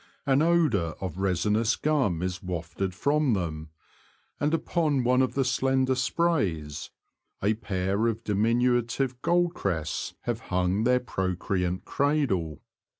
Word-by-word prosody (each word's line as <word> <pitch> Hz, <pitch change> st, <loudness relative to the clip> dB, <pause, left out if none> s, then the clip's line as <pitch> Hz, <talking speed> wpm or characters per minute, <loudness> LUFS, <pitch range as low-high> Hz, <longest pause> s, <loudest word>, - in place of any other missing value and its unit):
An 135 Hz, 0 st, +3 dB
odour 155 Hz, -, +2 dB
of 95 Hz, -2 st, -5 dB
resinous 105 Hz, +4 st, +1 dB
gum 130 Hz, -, 0 dB
is 90 Hz, 0 st, -3 dB
wafted 90 Hz, +1 st, -4 dB
from 145 Hz, +2 st, +2 dB
them, 80 Hz, -4 st, -4 dB, 0.7 s
and 145 Hz, +1 st, +1 dB
upon 160 Hz, -4 st, +1 dB
one 125 Hz, +1 st, +3 dB
of 130 Hz, -, 0 dB
the 135 Hz, -1 st, +1 dB
slender 130 Hz, +1 st, +2 dB
sprays 120 Hz, -, -1 dB, 0.5 s
a 105 Hz, +2 st, +3 dB
pair 100 Hz, 0 st, -1 dB
of 115 Hz, 0 st, -2 dB
diminutive 120 Hz, +4 st, +1 dB
goldcrests 170 Hz, -, 0 dB
have -, -, -2 dB
hung 90 Hz, +4 st, +1 dB
their 125 Hz, +1 st, +4 dB
procreant 95 Hz, -4 st, -2 dB
cradle. 130 Hz, -, 0 dB
115 Hz, 120 wpm, -27 LUFS, 90-135 Hz, 0.7 s, their